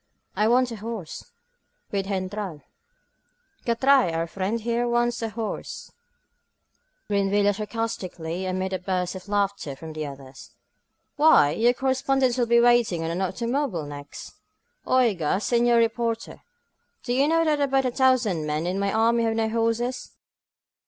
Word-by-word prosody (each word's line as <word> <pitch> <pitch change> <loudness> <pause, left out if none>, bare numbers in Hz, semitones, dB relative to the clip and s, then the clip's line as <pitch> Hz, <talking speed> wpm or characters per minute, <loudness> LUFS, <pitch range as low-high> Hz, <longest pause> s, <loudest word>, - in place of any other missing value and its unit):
^I 215 +1 +2
want 250 +1 +3
a 230 - -6
horse, 215 -6 -7 0.6
wd 195 -1 -1
GentraL 190 -4 -4 1.0
CarT'T'r'ai^ 250 -4 +3
our 165 0 0
friend 195 +6 -3
here 235 +2 -1
wants 240 0 0
a 225 - -2
horse 220 0 -6
P* - - -47
grinned 200 -1 +1
Villa 205 0 +3
sarcastically 190 -5 -4
amid 185 +1 -2
a 185 - -1
burst 180 -1 -2
of 190 +1 -9
laughter 200 -8 -1
from 160 +3 -9
the 155 -1 -4
others. 135 -1 -12 0.6
Why, 295 - +6
you 235 +8 +3
correspondents 265 -1 +1
will 240 - +2
be 235 0 +5
wanting 235 -8 +3
an 165 +3 -2
automobile 235 - -2
next! 145 0 -9 0.5
Oiga, 200 -10 +2
senor 235 +2 +2
reporter, 230 0 -1 0.6
do 245 - -2
you 270 +3 +3
know 330 +1 +2
that 300 -2 +1
about 270 -1 +2
a 250 - +1
thousand 240 - +2
men 150 +2 -1
in 185 +2 -1
my 200 0 0
army 230 +1 +2
have 225 0 0
no 225 -1 0
horses? 230 +2 -1
225 Hz, 145 wpm, -25 LUFS, 185-240 Hz, 1.0 s, Why